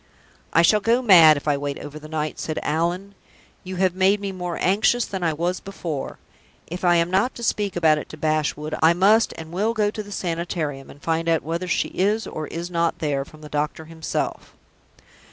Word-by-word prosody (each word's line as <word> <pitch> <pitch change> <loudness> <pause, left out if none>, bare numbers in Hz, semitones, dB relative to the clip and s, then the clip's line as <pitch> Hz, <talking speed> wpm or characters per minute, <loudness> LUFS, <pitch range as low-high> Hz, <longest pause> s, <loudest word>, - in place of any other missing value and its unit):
"I 165 - +4
shall 210 +5 +5
go 235 +4 +2
mad 165 -8 +8
if 145 - -7
I 145 -1 +2
wait 140 0 -4
over 145 +1 -8
the 155 - -11
night," 155 -1 -3
said 155 - -4
Allan. 175 +5 -1 0.5
"You 185 0 -6
have 185 -1 +2
made 190 +2 +3
me 200 -1 -4
more 180 -2 -4
anxious 215 +5 +2
than 190 -2 -5
I 165 - +2
was 170 +4 -2
before. 170 -7 -5 0.5
If 175 +3 -7
I 175 -1 +4
am 170 +1 +1
not 195 +7 +1
to 235 - -8
speak 205 -3 -1
about 160 -3 +3
it - - -9
to 155 - -9
Bashwood, 155 0 -1
I 160 +1 +6
must 205 +6 +4
and 160 0 -9
will 210 +6 0
go 210 -1 +1
to 215 - -5
the 205 -1 -11
Sanitarium, 165 -6 -3
and 145 - -15
find 165 0 0
out 165 -1 +2
whether 170 +3 -3
she 180 - 0
is 210 +4 0
or 155 -1 -5
is 170 +2 -6
not 170 -1 0
there, 145 -3 -1
from 155 +2 -16
the 150 - -9
doctor 150 +1 -3
himself." 160 0 -4
170 Hz, 210 wpm, -23 LUFS, 155-195 Hz, 0.5 s, mad